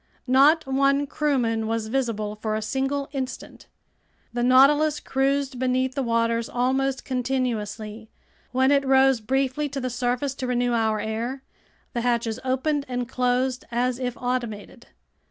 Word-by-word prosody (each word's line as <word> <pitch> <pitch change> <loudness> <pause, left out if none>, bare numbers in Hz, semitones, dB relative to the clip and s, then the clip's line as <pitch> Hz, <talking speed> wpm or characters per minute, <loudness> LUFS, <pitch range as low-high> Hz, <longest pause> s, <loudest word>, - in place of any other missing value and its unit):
Not 280 +5 +5
one 275 +1 +2
crewman 245 -7 0
was 225 -1 -1
visible 220 -4 -2
for 215 0 -3
a 215 - -2
single 270 +4 -1
instant. 265 -2 -6 0.7
The 240 - -1
Nautilus 280 +5 +5
cruised 270 -1 -1
beneath 255 0 0
the 275 - -2
waters 230 -1 0
almost 265 +2 0
continuously. 225 -4 -3 0.4
When 260 +2 +3
it 280 -1 +4
rose 265 -2 +4
briefly 270 +5 0
to 275 - -4
the 255 -1 -3
surface 250 +2 -1
to 255 - -3
renew 245 -1 +1
our 220 -2 +1
air, 230 +5 -3 0.5
the 240 - -1
hatches 235 -1 0
opened 275 +3 0
and 245 -1 -2
closed 250 +1 0
as 245 +1 0
if 250 -1 -3
automated. 240 -2 -4
255 Hz, 140 wpm, -24 LUFS, 235-270 Hz, 0.7 s, Not